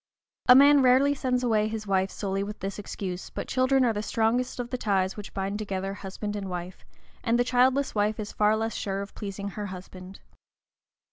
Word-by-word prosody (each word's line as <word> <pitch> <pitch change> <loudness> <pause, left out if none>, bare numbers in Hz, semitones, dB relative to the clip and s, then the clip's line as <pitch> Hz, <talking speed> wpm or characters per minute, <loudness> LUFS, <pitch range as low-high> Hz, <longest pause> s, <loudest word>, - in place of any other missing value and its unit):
A 250 - +11
man 285 +1 +7
rarely 260 +3 +5
sends 255 -2 -1
away 215 -3 +2
his 220 -1 -5
wife 190 -1 +1
solely 195 -1 -3
with 205 +1 -5
this 195 +1 -5
excuse, 185 -3 -5
but - - -6
children 260 0 +3
are 230 - +2
the 210 - -2
strongest 225 +4 0
of 240 -1 -4
the 255 - -1
ties 190 -3 0
which 205 -1 -8
bind 195 +2 -3
together 195 -2 -3
husband 205 +1 -6
and 195 -2 -4
wife, 180 0 -6 0.4
and 235 0 +2
the 245 - +3
childless 255 +2 +2
wife 210 +1 0
is 210 -1 -4
far 210 0 +3
less 225 0 -2
sure 195 0 -3
of 200 - -11
pleasing 200 -1 -5
her 205 +1 -5
husband. 185 0 -10
210 Hz, 200 wpm, -27 LUFS, 195-245 Hz, 0.4 s, A